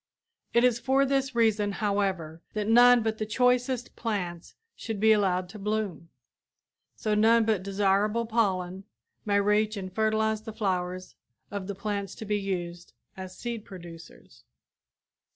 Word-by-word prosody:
It 235 - +3
is 245 -2 +3
for 265 +3 +2
this 270 -1 0
reason, 215 -3 +2
however, 190 -6 -1
that 210 -1 -2
none 245 +1 +6
but 220 0 -2
the 215 - -1
choicest 250 +2 +1
plants 180 -7 -4 0.2
should 225 -4 -5
be 220 +1 +5
allowed 185 -4 +2
to 210 - -10
bloom, 205 -5 -3 0.9
so 215 -2 -1
none 225 +2 +4
but 215 -4 +1
desirable 200 +3 +1
pollen 195 -4 -1 0.4
may 200 -1 +2
reach 210 +1 +1
and 185 -2 -6
fertilize 220 0 +1
the 220 0 -8
flowers 185 -4 -2 0.4
of 200 -2 -5
the 200 - -4
plants 200 0 -4
to 220 - -8
be 210 0 0
used 175 -3 -5 0.2
as 185 -1 -9
seed 235 -3 -5
producers. 170 -4 -13
210 Hz, 145 wpm, -27 LUFS, 190-225 Hz, 0.9 s, none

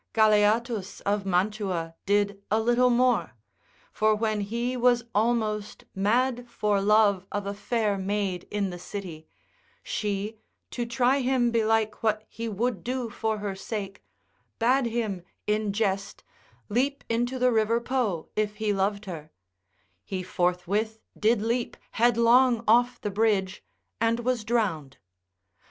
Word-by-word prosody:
Galeatus 215 0 +2
of 200 -1 -1
Mantua 185 -3 -1
did 200 0 +1
a 215 - +2
little 240 +2 +3
more: 250 +1 +2 0.6
for 215 0 +2
when 215 -1 -1
he 235 +5 -2
was 245 -1 +3
almost 215 -1 0
mad 240 +5 +1
for 210 -3 0
love 200 -2 +3
of 205 -1 -3
a 200 - -3
fair 205 -1 -1
maid 195 -2 -2
in 200 -2 -1
the 175 - -7
city, 175 -5 -7 0.6
she, 210 +1 -3 0.3
to 240 -1 -3
try 250 +3 +2
him 250 -2 +2
belike 220 -1 +1
what 215 -1 0
he 230 0 -5
would 220 -2 -2
do 250 -2 -3
for 220 0 -1
her 205 -1 -3
sake, 195 0 -6 0.5
bade 250 +2 +3
him 220 -5 -2 0.2
in 210 0 0
jest 195 -2 -2 0.4
leap 265 +6 0
into 240 +3 -1
the 250 0 +3
river 225 +1 +2
Po 235 -9 -1
if 210 -1 -1
he 210 -1 0
loved 200 +2 -1
her; 160 -5 -7 0.7
he 185 -1 -4
forthwith 185 +5 -1 0.2
did 215 0 +2
leap 235 +2 -1
headlong 235 +1 +4
off 240 +3 +4
the 205 - -3
bridge 200 -2 0 0.4
and 230 +1 +1
was 245 -2 0
drowned. 190 - -1
215 Hz, 135 wpm, -27 LUFS, 200-235 Hz, 0.7 s, headlong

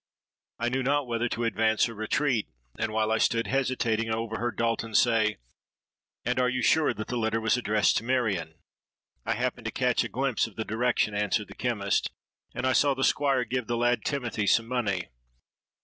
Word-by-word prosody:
I 120 +1 0
knew 130 +2 -1
not 145 +2 +1
whether 120 0 -1
to 120 - -3
advance 110 0 +2
or 115 - -7
retreat; 110 +2 0 0.3
and 110 - -1
while 110 0 0
I 110 - +2
stood 115 0 +2
hesitating, 120 -4 0
I 110 - +1
overheard 115 +1 -3
Dalton 115 -1 -1
say, 110 -3 +3 0.9
'And 125 +2 0
you - - +3
are 125 0 0
sure 155 +4 +4
that 110 -2 -6
the 125 - -2
letter 110 0 0
was 110 +1 +2
addressed 110 -4 +2
to - - -2
Marion?'—'I 100 - -4
happened - - -2
to - - -2
catch - - +1
a - - -5
glimpse - - 0
of - - -15
the 110 - -3
direction,' 110 -1 0
answered 105 +1 -1
the - - -9
chemist, 105 -5 0 0.5
'and 125 - -2
I 130 - +3
saw 140 0 +3
the 130 - -2
Squire 135 -4 +2
give 125 0 -3
the 120 - -1
lad 120 +1 +1
Timothy 120 -7 -2
some 115 +4 +4
money.' 105 -8 -1
115 Hz, 190 wpm, -27 LUFS, 110-125 Hz, 0.9 s, sure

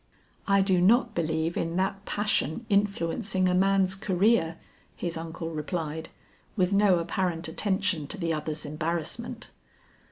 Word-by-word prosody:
"I 200 -1 +4
do 190 -2 +2
not 230 +4 +4
believe 160 -1 -1
in 165 0 -2
that 195 +2 -1
passion 205 - -1
influencing 200 -1 +1
a 180 - +2
man's 190 0 +3
career," 190 -3 +2 0.4
his 170 -1 -3
uncle 165 0 -5
replied 160 0 -4 0.5
with 185 -2 +2
no 200 -2 +5
apparent 170 0 -1
attention 190 -2 -1
to 210 - -5
the 165 -3 -1
other's 155 0 -3
embarrassment. 165 +10 -4
180 Hz, 130 wpm, -27 LUFS, 165-200 Hz, 0.5 s, no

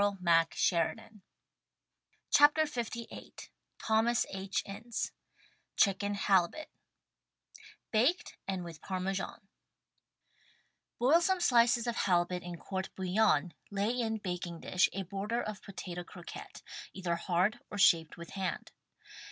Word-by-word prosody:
THE 180 -5 +3
STAG 170 -2 +2 1.4
COOK 290 +1 +7
BOOK 315 0 +3
Lvni 235 -5 -6 0.3
Thomas 225 +2 +2
H, 195 0 -2
Ince 215 +4 -4 0.7
CHICKEN 200 +1 +2
HALIBUT 195 - +2 1.2
{Baked 255 +11 +2
and 190 -2 -2
with 165 -3 -9
Parmesan) 195 +2 -3 1.5
Boil 290 +8 +5
some 375 +2 +2
slices 240 -6 +4
of 235 -1 -2
halibut 180 -1 +1
in 175 -1 -7
court 190 +2 -4
bouillon, 185 -4 +2 0.2
lay 200 +2 0
in 230 -3 -1
baking 180 -4 -5
dish 185 - +2
a 195 - -3
border 200 +6 -2
of 215 -2 -5
potato 180 -3 -7
croquette 175 0 -10 0.2
— - - -13
either 180 -3 -1
hard 180 +4 +1
or 205 - -6
shaped 165 -5 +4
with 170 -1 -9
hand. 190 -2 -3
195 Hz, 120 wpm, -32 LUFS, 180-230 Hz, 1.5 s, COOK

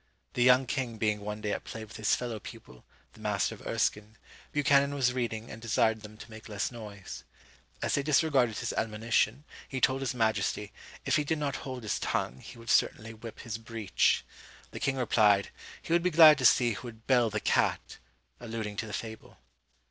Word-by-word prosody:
The 125 - -1
young 125 +1 +6
king 120 -3 -3
being 105 -1 0
one 105 +1 -6
day 105 - -2
at - - -3
play 110 0 -7
with 110 +1 -11
his 110 -1 +2
fellow 120 -3 -4
pupil, 100 - -12 0.3
the - - -17
master - - 0
of - - -11
Erskine, 105 +1 -1 0.3
Buchanan 140 -1 +3
was 125 -3 +2
reading, 115 -2 -3
and 110 - -9
desired 110 -1 +1
them 105 0 -11
to 110 - -12
make 110 +1 -11
less 105 +2 -2
noise. 105 -5 -9 0.6
As - - 0
they 140 - +2
disregarded 140 -5 +2
his - - -3
admonition, 110 +5 0 0.3
he 135 - -3
told 130 +1 +2
his 130 -2 -2
majesty, 105 -2 0 0.3
if - - +3
he 150 - +1
did 160 +2 -1
not 145 -2 -2
hold 130 -3 -7
his 110 - -1
tongue, 65 - -2
he 120 - -12
would 115 -1 -4
certainly 110 +1 +1
whip 115 0 -10
his 115 -1 -5
breech. 110 -4 0 0.5
The - - -7
king 135 - 0
replied, 105 -6 +3 0.3
he - - -2
would 170 - +4
be 180 - +2
glad 155 -3 +8
to 130 - 0
see 120 0 +5
who 115 +3 -6
would 115 -1 -12
bell 125 -3 +3
the 105 0 -2
cat, - - 0 0.4
alluding 110 -3 -5
to 110 - -3
the 105 - -8
fable. 110 +2 -7
115 Hz, 200 wpm, -29 LUFS, 110-130 Hz, 0.6 s, glad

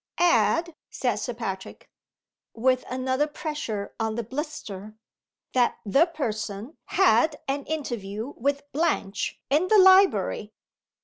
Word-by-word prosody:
"Add," 340 -1 +3 0.2
said - - -1
Sir 245 - -4
Patrick, 190 -5 -6 0.7
with 255 +2 +2
another 260 +3 0
pressure 295 -9 -4
on 220 -1 -1
the 235 - -2
blister, 215 - -6 0.6
"that 245 -2 +2
The 275 - +4
Person 225 - -4
had 295 - +3
an 275 +1 -2
interview 240 -6 -4
with 280 +3 -1
Blanche 240 -10 -1
in 310 +6 +3
the 430 - +5
library." 375 - +5
260 Hz, 115 wpm, -26 LUFS, 215-310 Hz, 0.7 s, the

